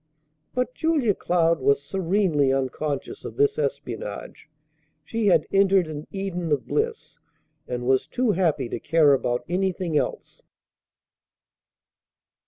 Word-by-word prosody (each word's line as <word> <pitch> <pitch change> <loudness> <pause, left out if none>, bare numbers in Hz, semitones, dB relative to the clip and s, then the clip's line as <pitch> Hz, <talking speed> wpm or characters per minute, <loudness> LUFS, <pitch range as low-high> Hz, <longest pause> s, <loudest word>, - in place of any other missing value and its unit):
But 250 0 -1
Julia 300 -10 +1
Cloud 170 -2 +1
was 140 +1 +2
serenely 175 -5 +1
unconscious 135 - -2
of - - -8
this 425 +2 +2
espionage. - - -5 0.5
She 225 -2 -1
had 170 -5 +4
entered 195 -2 +4
an 155 -1 -7
Eden 180 -4 -4
of 145 -3 +1
bliss, 450 +1 -2 0.5
and 125 -1 -4
was 130 0 +2
too 250 -3 +1
happy 170 -9 +1
to - - -4
care 150 0 +4
about 125 -2 0
anything 180 -2 -1
else. - - -2
175 Hz, 120 wpm, -24 LUFS, 145-200 Hz, 0.5 s, had